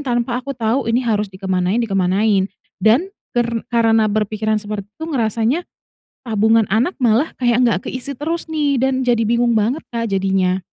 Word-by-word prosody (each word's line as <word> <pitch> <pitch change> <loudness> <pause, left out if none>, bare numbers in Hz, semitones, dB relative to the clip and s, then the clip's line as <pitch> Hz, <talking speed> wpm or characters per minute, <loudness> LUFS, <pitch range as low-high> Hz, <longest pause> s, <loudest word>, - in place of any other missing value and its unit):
tanpa 240 -1 -1
aku 275 - -6
tahu 235 -1 0
ini 235 +2 +2
harus 210 -3 0
dikemanain 185 +1 -1
dikemanain 195 -1 +1 0.4
dan 240 - +4 0.2
ker 240 -1 +1 0.3
karena 225 -1 +3
berpikiran 215 +1 0
seperti 205 -1 -5
itu 265 +10 -9
ngerasanya 230 - 0 0.7
tabungan 220 0 +3
anak 240 - +1
malah 240 +7 +3
kayak 240 -1 +2
nggak 230 -7 +2
ke - - -2
isi 260 +2 -5
terus 325 +4 -3
nih 290 -4 +1
dan 260 0 +1
jadi 235 -2 +3
bingung 235 +1 +2
banget, 230 +8 0
Kak, 230 -1 -2
jadinya. 190 -1 +1
225 Hz, 160 wpm, -19 LUFS, 210-250 Hz, 0.7 s, dan